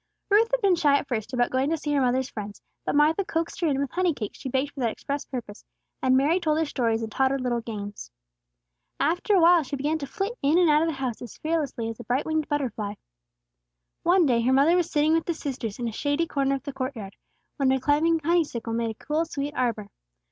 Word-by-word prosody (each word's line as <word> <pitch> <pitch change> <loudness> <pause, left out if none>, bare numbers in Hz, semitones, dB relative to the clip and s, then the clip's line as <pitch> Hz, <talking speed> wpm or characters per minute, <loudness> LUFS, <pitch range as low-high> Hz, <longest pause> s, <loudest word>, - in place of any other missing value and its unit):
Ruth 440 +3 +5
had - - 0
been 395 -3 +4
shy 295 -4 +4
at 280 - -4
first 230 -3 -3
about 245 -2 +1
going 260 +2 +1
to 325 - 0
see 295 -1 -3
her 280 - +2
mother's 255 +1 +1
friends; 205 -1 -7 0.2
but - - -1
Martha 310 +6 +4
coaxed 330 -1 -3
her 340 - +2
in 275 -3 +1
with 280 -2 -2
honey 360 -3 +1
cakes 210 -5 -6
she 265 - -5
baked 270 +3 -1
for 280 - -10
that 240 -3 +1
express 280 +5 -4
purpose, 235 -5 -7 0.4
and 260 0 +4
Mary 305 +7 +3
told 310 -3 +1
her 320 - +1
stories 230 -6 0
and 220 - -5
taught 265 +3 +2
her 275 - 0
little 245 -2 -1
games. 205 - -7 0.9
After 350 +7 +2
a - - +5
while 340 0 +6
she 280 -1 -5
began 295 +4 -1
to 280 - -5
flit 410 - -3
in 290 +4 +3
and 350 -3 +5
out 300 +1 +4
of 330 - +1
the 320 - -2
house 260 -4 -4
as 240 - -9
fearlessly 305 -8 -2
as 225 0 -6
a - - -7
bright 250 +4 -1
winged 315 -1 -1
butterfly. 225 -8 -2 1.1
One 350 0 +4
day 240 -4 +2
her 245 +3 +2
mother 285 +6 +5
was 350 -2 +1
sitting 300 +1 +2
with 325 0 +1
the 340 - 0
sisters 260 -9 -4
in 240 - -3
a - - -2
shady 285 +7 0
corner 275 -3 0
of 270 - -6
their 280 - -6
court 265 +1 -3
yard, 200 -3 -8 0.4
where 270 -3 +2
a 265 - +2
climbing 315 +4 +2
honeysuckle 300 -9 0
made 230 0 0
a 220 - -10
cool 310 +2 +1
sweet 290 -2 -4
arbor. 225 -5 -1
280 Hz, 245 wpm, -26 LUFS, 245-320 Hz, 1.1 s, while